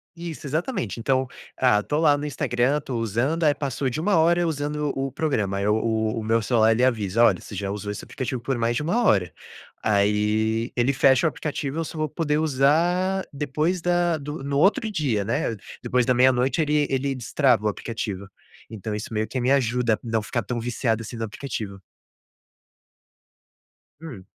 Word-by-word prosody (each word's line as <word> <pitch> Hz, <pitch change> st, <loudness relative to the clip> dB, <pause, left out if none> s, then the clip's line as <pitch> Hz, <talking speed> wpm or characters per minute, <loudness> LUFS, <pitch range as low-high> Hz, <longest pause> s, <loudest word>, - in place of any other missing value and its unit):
Isso, 170 Hz, -3 st, -7 dB
exatamente. 150 Hz, -, -2 dB
Então, 130 Hz, +2 st, +1 dB, 0.3 s
ah, 125 Hz, -5 st, +3 dB
tô 145 Hz, -, -2 dB
lá 150 Hz, -3 st, +5 dB
no 145 Hz, -, -5 dB
Instagram, 135 Hz, 0 st, 0 dB
tô 130 Hz, -4 st, -4 dB
usando, 120 Hz, -, 0 dB
aí, 145 Hz, -, +5 dB
passou 135 Hz, -1 st, -2 dB
de 140 Hz, -, -4 dB
1 200 Hz, +5 st, +2 dB
hora 170 Hz, +2 st, +3 dB
usando 150 Hz, -1 st, -2 dB
o 135 Hz, 0 st, -2 dB
programa, 110 Hz, -10 st, -1 dB
aí, 100 Hz, +1 st, -1 dB
o 110 Hz, +2 st, +1 dB, 0.2 s
o 115 Hz, -, -3 dB
meu 115 Hz, +1 st, +2 dB
celular, 110 Hz, -1 st, +3 dB
ele 115 Hz, +3 st, +2 dB
avisa: 115 Hz, -3 st, +2 dB
"Olha, 100 Hz, -6 st, +4 dB
você 105 Hz, -, -9 dB
já 100 Hz, +1 st, -3 dB
usou 105 Hz, 0 st, -4 dB
esse 105 Hz, -, -6 dB
aplicativo 130 Hz, -1 st, -4 dB
por 130 Hz, +2 st, -2 dB
mais 115 Hz, 0 st, 0 dB
de 150 Hz, -, -1 dB
1 225 Hz, +10 st, +1 dB
hora". 95 Hz, -, +2 dB, 0.5 s
Aí, 110 Hz, +2 st, +1 dB
ele 125 Hz, +3 st, +2 dB
fecha 130 Hz, +1 st, +4 dB
o -, -, +4 dB
aplicativo 150 Hz, -1 st, -4 dB
e -, -, 0 dB
eu -, -, 0 dB
só 160 Hz, -, -8 dB
vou 155 Hz, 0 st, 0 dB
poder 150 Hz, 0 st, -1 dB
usar 165 Hz, +6 st, +2 dB
depois 150 Hz, +5 st, -1 dB
da 175 Hz, -1 st, +1 dB
do 145 Hz, 0 st, -6 dB
no 140 Hz, 0 st, -1 dB
outro 215 Hz, +5 st, +3 dB
dia, 130 Hz, -, 0 dB
né? 115 Hz, +1 st, -1 dB, 0.3 s
Depois 125 Hz, -1 st, +1 dB
da 125 Hz, -, +3 dB
00:00, 130 Hz, +3 st, +3 dB
ele 150 Hz, -1 st, +2 dB
ele 135 Hz, +1 st, 0 dB
destrava 125 Hz, -2 st, +1 dB
o -, -, +4 dB
aplicativo. 105 Hz, -3 st, -4 dB, 0.4 s
Então 110 Hz, -1 st, -5 dB
isso 105 Hz, +2 st, -5 dB
meio 110 Hz, 0 st, -1 dB
que 130 Hz, -, -3 dB
me 130 Hz, +2 st, +2 dB
ajuda 125 Hz, -4 st, +2 dB
a -, -, -17 dB
não 115 Hz, -2 st, -1 dB
ficar 115 Hz, +2 st, -3 dB
tão 120 Hz, -2 st, -3 dB
viciado 115 Hz, -1 st, -1 dB
assim 115 Hz, +1 st, -7 dB
no 115 Hz, -, -3 dB
aplicativo. 110 Hz, -4 st, -6 dB, 2.2 s
Hum. 105 Hz, -, -9 dB
130 Hz, 190 wpm, -24 LUFS, 110-150 Hz, 2.2 s, lá